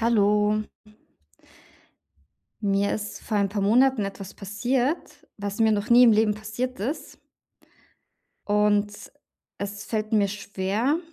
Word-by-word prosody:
Hallo. 210 -1 +2 2.0
Mir 200 -1 +1
ist 210 0 -6
vor 215 - -2
ein 200 -1 +2
paar 200 +1 -3
Monaten 245 +2 +3
etwas 195 -1 -7
passiert, 245 - -2
was 200 0 -5
mir 220 -1 +4
noch 205 +2 -2
nie 245 +1 +8
im 235 - +7
Leben 215 0 +3
passiert 220 +4 -5
ist 265 +10 -4 1.3
und 205 0 +2 0.7
es 205 0 -5
fällt 215 -1 -3
mir 205 -2 +3
schwer 205 - -1
210 Hz, 120 wpm, -25 LUFS, 205-230 Hz, 2.0 s, nie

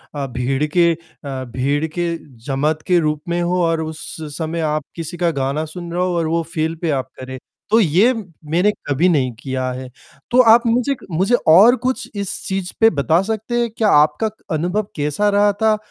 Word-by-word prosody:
अ, 140 -1 -2
भीड़ 130 +3 -1
के 170 -1 +5
अ, 140 -5 -8
भीड़ 140 +4 0
के 170 -1 0 0.3
जमात 150 +3 0
के 180 -1 +4
रूप 150 -1 -1
में 175 +1 0
हो 180 +1 0
और 165 -1 +1
उस 160 0 -6 0.2
समय 165 0 -3
आप 155 -2 -1
किसी 165 +1 -6
का 170 -2 +1
गाना 140 +2 -2
सुन 170 +2 -8
रहे 180 - -1
हो 180 -1 0
और 165 -1 0
वो 165 +1 +1
फ़ील 160 +1 -1
पे 165 - -1
आप 130 0 -6
करें। 130 0 -7 0.3
तो 225 +2 +5
ये 195 - +4
मैंने 180 -2 -1 0.2
कभी 145 +6 +2
नहीं 135 -6 +1
किया 130 -1 -3
है। 130 0 -7 0.4
तो 255 +1 +6
आप 240 +1 +4
मुझे 250 +4 +1
क - - -16
मुझे 190 +9 +2
और 205 +10 +8
कुछ 260 - -1
इस 200 -2 -2
चीज़ 190 -2 -3
पे 225 0 +7
बता 160 +2 +2
सकते 220 +3 -2
हैं 235 - 0
क्या 215 -2 +2
आपका 150 +8 +4
क 220 - -26
अनुभव 180 +6 -1
कैसा 150 +8 0
रहा 205 0 +3
था? 215 +1 +2
170 Hz, 205 wpm, -19 LUFS, 150-200 Hz, 0.4 s, और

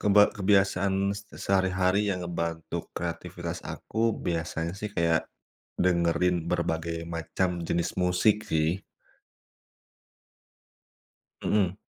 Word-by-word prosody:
Keba 105 0 +6
kebiasaan 95 -1 +3 0.2
se 105 - -14
sehari-hari 95 +1 +2
yang 90 -1 -2
ngebantu 85 -2 -3 0.2
kreativitas - - -4 0.2
aku 110 - -3 0.2
biasanya 80 -1 -1
sih 105 - -3
kayak 85 -1 +3 0.6
dengerin 90 0 +3
berbagai 85 -1 -1 0.2
macam 85 +3 0 0.2
jenis 85 +1 0
musik 90 +4 +3
sih. 80 -1 +3 2.7
Mhm. 100 -2 +1
90 Hz, 90 wpm, -28 LUFS, 85-95 Hz, 2.7 s, Keba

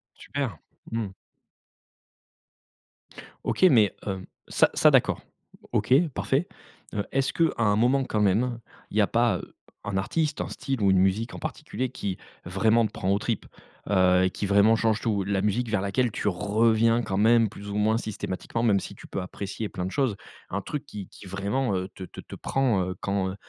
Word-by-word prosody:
Super. 130 - -4 0.3
Mmh. 110 -4 -2 2.3
OK, - - -1
mais, 115 - +6
hem, 95 -2 -4 0.2
ça, - - +3
ça - - +6
d'accord. - - +3 0.5
OK, 110 +4 +2 0.2
parfait. 145 +10 0 0.5
Heu, 105 -2 -1
est-ce 135 0 0
qu'à 165 -1 +3
un 105 -3 +3
moment 125 +5 +3
quand 105 -4 -1
même, 115 +5 +2 0.3
il - - -8
y - - +6
a 100 - +3
pas, 115 -4 +2
heu, - - -11 0.3
un 100 -2 -2
artiste, 150 +9 -1
un - - -3
style 135 -4 -3
ou 100 -1 +4
une 95 - +4
musique 100 +5 +1
en - - -7
particulier 125 +4 -4
qui, 100 -6 -4 0.3
vraiment 110 +5 +3
te - - -3
prend 95 - -3
aux 100 - +2
tripes? 115 -1 -2 0.4
Heu, 95 -2 +4
et - - +2
qui 100 - -4
vraiment 100 +3 +5
change 110 -1 +1
tout. 105 -4 0
La 100 -1 0
musique 105 +4 0
vers 105 -3 +1
laquelle 110 +4 +1
tu - - -2
reviens 110 +4 +2
quand 100 -4 -2
même 115 +1 +5
plus 100 -1 -9
ou 100 - -4
moins 110 +2 +2
systématiquement, 110 +1 -4
même 105 -4 +4
si - - -8
tu - - -13
peux 95 - -3
apprécier 100 +4 -5
plein 90 - -4
de 95 - -4
choses. 130 -5 +1 0.3
Un 100 +1 -2
truc 150 +5 -5
qui 100 -3 -8
qui - - -14
vraiment, 100 +4 -1
heu, 95 0 -2
te 95 - -8
te - - -10
te - - -10
prend, 125 -8 +1
heu, 90 0 -4
quand, 100 -1 0
heu, 95 - -7
105 Hz, 195 wpm, -26 LUFS, 95-115 Hz, 2.3 s, mais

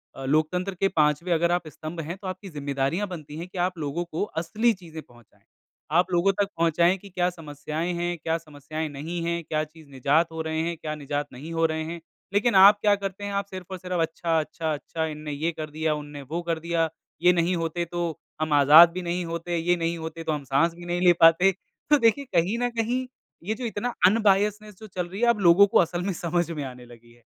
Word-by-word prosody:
अ, 135 - -7
लोकतंत्र 155 +7 0
के 195 +2 +2
5वें 150 +1 +1
अगर 170 +1 +2
आप 175 -2 0
स्तंभ 155 +3 -8
हैं, 165 +3 -5
तो 195 - -8
आपकी 185 +1 -6
ज़िम्मेदारियाँ 145 +5 -2
बनती 155 -5 -8
हैं 170 +2 -6
कि 185 - -11
आप 180 -1 -4
लोगों 160 +2 -2
को 160 - -1 0.2
असली 215 +8 +1
चीज़ें 165 -5 -10
पहुँचाएँ। 120 -5 -22 0.5
आप 180 +1 +2
लोगों 175 +3 +3
तक 200 - +1
पहुँचाएँ 170 +2 +3
कि 200 +1 -14
क्या 180 -1 0
समस्याएँ 155 +1 -5
हैं, 175 0 -2
क्या 165 0 0
समस्याएँ 155 0 -6
नहीं 155 +5 -5
हैं, 170 0 -1
क्या 155 0 -1
चीज़ 155 0 -14
निजात 145 +5 +1
हो 160 - -4
रहे 160 0 -2
हैं, 170 - -2
क्या 155 -1 -5
निजात 145 0 -3
नहीं 145 +6 -8
हो 165 0 +2
रहे 160 0 -1
हैं, 170 +2 -6 0.3
लेकिन 210 +2 +2
आप 200 +2 +8
क्या 205 -1 +4
करते 195 0 -6
हैं 205 0 -4
आप 200 0 -1
सिर्फ़ 185 -2 -8
और 190 - -4
सिर्फ़ 180 -1 -2
अच्छा-अच्छा-अच्छा 160 -1 -2
इन 155 -1 -5
ने - - -2
ये 155 +4 -1
कर 155 -1 -6
दिया, 155 +1 -1
उन्होंने 145 -1 -7
वो 170 - -1
कर 170 -1 -2
दिया, 165 0 0 0.3
ये 180 +1 +6
नहीं 175 +1 +1
होते 170 +1 -2
तो, 170 -1 -3 0.2
हम 155 -1 0
आज़ाद 150 +4 +8
भी 185 - -4
नहीं 175 0 -2
होते 170 +1 -3
ये 175 +2 +2
नहीं 170 0 -1
होते 160 0 -6
तो 160 - -1
हम 150 -2 -3
साँस 140 +6 +2
भी 175 0 -11
नहीं 175 0 -2
ले 175 - +8
पाते। 165 +4 +7 0.4
तो 300 - +6
देखिए 235 +4 +3
कहीं 180 +6 +2
न 245 0 +1
कहीं 235 +3 -1 0.4
ये 210 +5 -1
जो 250 - -5
इतना 235 +2 -3
अनबायस्डनेस 210 0 +2
जो 220 - -10
चल 180 -3 -4
रही 195 +5 -7
है 240 - +4
अब 235 -3 +2
लोगों 185 +2 +6
को - - +2
असल 175 0 +1
में 195 +1 -1
समझ 170 0 -1
में 150 -3 -4
आने 125 -2 -9
लगी 120 -1 -16
है। 120 0 -25
170 Hz, 230 wpm, -25 LUFS, 155-185 Hz, 0.5 s, आप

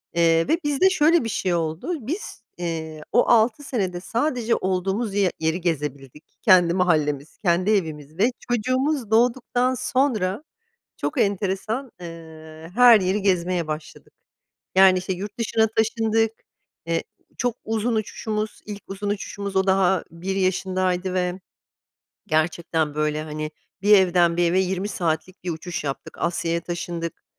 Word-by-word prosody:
Eee, 165 -1 +3
ve 325 - +3
bizde 295 +6 +3
şöyle 335 -4 +4
bir 225 - -3
şey 185 -3 -1
oldu. 170 - -3
Biz, 325 - -5
eee, 160 -3 -4
o 245 - +4
6 235 +4 +4
senede 190 -10 -2
sadece 235 +2 0
olduğumuz 190 +3 -1
ye 195 -3 +2
yeri 160 +3 0
gezebildik 150 -4 -3 0.2
kendi 180 -4 +5
mahallemiz, 155 -5 0
kendi 185 +2 +1
evimiz. 155 -5 -2
Ve 230 +6 +3 0.2
çocuğumuz 255 +1 0
doğduktan 245 +2 +2
sonra 255 -4 0 0.5
çok 290 - -3
enteresan, 205 +5 -1
ııı, 160 -1 -10
her 240 -3 +8
yeri 190 +2 0
gezmeye 180 -3 +1
başladık. 155 0 -7 0.6
Yani 190 -1 +7
işte 185 +1 -3
yurt 200 +4 -6
dışına 220 -1 +2
taşındık, 225 0 +2 0.5
eee, 165 0 0 0.4
çok 245 -1 0
uzun 225 +1 -1
uçuşumuz, 215 0 -3
ilk 205 -1 -7
uzun 200 +1 -4
uçuşumuz 200 -1 -4
o 190 0 +3
daha 190 -2 +3
1 185 +4 -4
yaşındaydı 185 -1 0
ve 180 0 -1 0.9
gerçekten 155 -1 0
böyle 155 0 0
hani 155 0 -5 0.3
bir 210 +1 +5
evden 175 -2 +3
bir 175 - +3
eve 185 - +3
20 190 +1 -1
saatlik 175 0 -3
bir 180 - -3
uçuş 165 0 -5
yaptık 135 -2 -5
Asya'ya 170 -1 0
taşındık. 170 -1 -5
185 Hz, 140 wpm, -23 LUFS, 170-220 Hz, 0.9 s, her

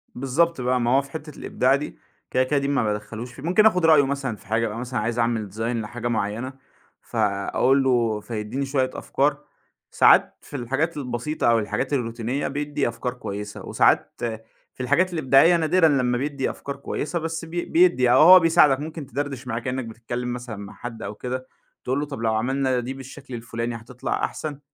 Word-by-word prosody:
بالضبط 135 +4 +1
بقى، 125 0 +1
ما 120 - +1
هو - - +4
في 140 0 -14
حِتّة 155 -1 -8
الإبداع 130 +2 +1
دي، 145 +2 -5 0.3
كده، 130 - +3
كده 140 +2 +1
دي 140 - -2
ما 140 -4 +1
بادَخّلوش 110 +3 -4
فيه، 130 - -12
ممكن 185 +6 +3
آخُد 180 -6 +4
رأيه 155 -3 +6
مثلًا 135 -4 -2
في 100 - -19
حاجة، 110 +2 +1
أبقى 105 +1 -5
مثلًا 125 0 -3
عايز 115 +2 -2
أعمل 115 -4 -1
design 110 - -10
لحاجة 115 0 -3
معيّنة، 115 +3 -2 0.5
فأقول 110 +5 +1
له 120 -5 +2
فيدِّيني 110 +5 -4
شوية 135 -1 0
أفكار. 145 +1 -1 0.5
ساعات - - +5
في - - -11
الحاجات 135 +7 -1
البسيطة 125 +2 -2
أو 115 - +4
الحاجات 110 +6 -2
الروتينية، 120 +1 -2
بيدّي 145 0 -2
أفكار 120 +1 -3
كويسة 105 -4 -7
وساعات - - +2 0.6
في 130 - -6
الحاجات 185 +8 +2
الإبداعية 155 +2 +5
نادرًا 165 +1 +3
لمَّا 125 -4 +2
بيدّي 140 0 -2
أفكار 140 - -6
كويسة، 150 +4 -3
بس 165 0 -4
بي 170 +1 -4
بيدّي، 170 -7 +3
يعني 125 -1 +5
هو 185 +4 +10
بيساعدك 165 -5 +4
ممكن 155 0 -6
تدردش 135 -2 -4
معاه 115 -1 -2
كإنّك 130 +1 -3
بتتكلِّم 120 +2 -5
مثلًا 120 -2 -6
مع 100 0 -9
حد 115 -2 -8
أو 100 0 -5
كده، 130 +3 -5 0.4
تقول 130 +2 -1
له 145 - -1
طَب 140 -5 -7
لو 110 -1 +1
عملنا 130 +3 0
دي 125 +2 -4
بالشكل 135 0 -11
الفُلاني 115 0 -4
هتطلع 125 +3 -4
أحسن؟ 150 -3 -6
130 Hz, 185 wpm, -24 LUFS, 115-145 Hz, 0.6 s, هو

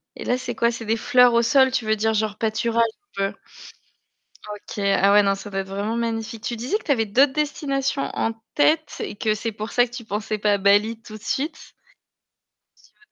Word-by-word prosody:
Et - - -8
là 250 - +1
c'est 255 - -5
quoi? 235 0 +2
C'est 230 -1 -7
des 225 +2 0
fleurs 250 +1 +4
au 235 - +4
sol, 260 +2 +4
tu 245 -4 -1
veux 215 0 +2
dire 220 +1 0
genre 215 -1 -1
pâturage 230 +1 +1 0.3
un 195 0 0
peu? - - -20 1.1
OK, 210 0 -8 0.2
ah 200 +1 +4
ouais 205 0 +7
non 195 0 +2
ça 205 +1 -9
doit 195 0 -2
être 190 - -7
vraiment 205 +4 -3
magnifique. 225 -1 -3
Tu 240 - -3
disais 255 - -1
que - - -19
tu 290 - +2
avais 225 -4 +1
d'autres 265 +7 +3
destinations 275 -2 -1
en 225 - 0 0.2
tête 310 +2 +2
et - - -4
que 215 0 0
c'est 225 +1 -4
pour 215 +1 -6
ça 245 - +4
que - - -18
tu 240 0 -8
pensais 215 +1 -3
pas 210 0 +2
à 200 - +2
Bali 205 +3 +3
tout 215 -1 -10
de 210 - -22
suite? 290 +8 -4 1.1
Tu - - -24
veux 425 - -28
225 Hz, 230 wpm, -23 LUFS, 210-250 Hz, 1.1 s, ouais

